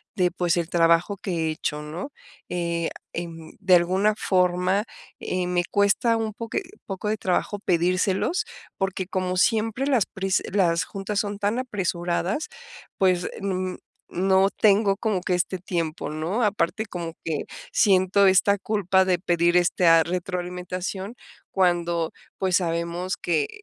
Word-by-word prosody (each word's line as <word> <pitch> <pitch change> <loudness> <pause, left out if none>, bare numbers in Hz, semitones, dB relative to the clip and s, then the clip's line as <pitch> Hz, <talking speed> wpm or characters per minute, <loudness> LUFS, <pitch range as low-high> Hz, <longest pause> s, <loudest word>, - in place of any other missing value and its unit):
de 180 -3 +2
pues, 175 -1 0
el 170 0 -1
trabajo 170 +3 +3
que 170 -5 -2
he - - 0
hecho, 150 -1 -3
¿no?, 170 - -6 0.4
eh, 170 -1 -1 0.2
em, 165 -2 -6
de 185 -3 +5
alguna 190 +5 +2
forma, 180 +2 +1 0.3
eh, 180 -1 -2
me 175 -1 +1
cuesta 210 +3 +3
un 220 -2 -2
poqui 230 - -3 0.2
poco 195 +2 -4
de 215 - 0
trabajo 195 +1 -1
pedírselos, 185 - +1 0.3
porque 195 -1 -2
como 185 -1 -2
siempre 225 +5 +2
las 250 -8 +3
prisa 190 0 -1
las 170 -4 +2
juntas 200 +1 -3
son 205 -1 -3
tan 210 +5 0
apresuradas, 190 - -2 0.5
pues, 180 -2 +2
mm, 185 -1 -2 0.3
no 190 +2 +3
tengo 200 -1 +3
como 210 -4 -1
que 185 - -1
este 180 +1 -1
tiempo, 170 -3 -3
¿no?, 170 +10 -1
aparte, 210 +1 0
como 170 -5 -6
que 155 -3 -2 0.3
siento 195 0 +4
esta 195 +1 +4
culpa 190 -3 +2
de 180 -1 +2
pedir 175 -1 +2
esta 170 -2 +4
retroalimentación 180 +3 -4 0.4
cuando, 175 -3 +1 0.3
pues, 185 -1 +2
sabemos 170 +1 -2
que 155 -4 0
185 Hz, 140 wpm, -24 LUFS, 175-200 Hz, 0.5 s, de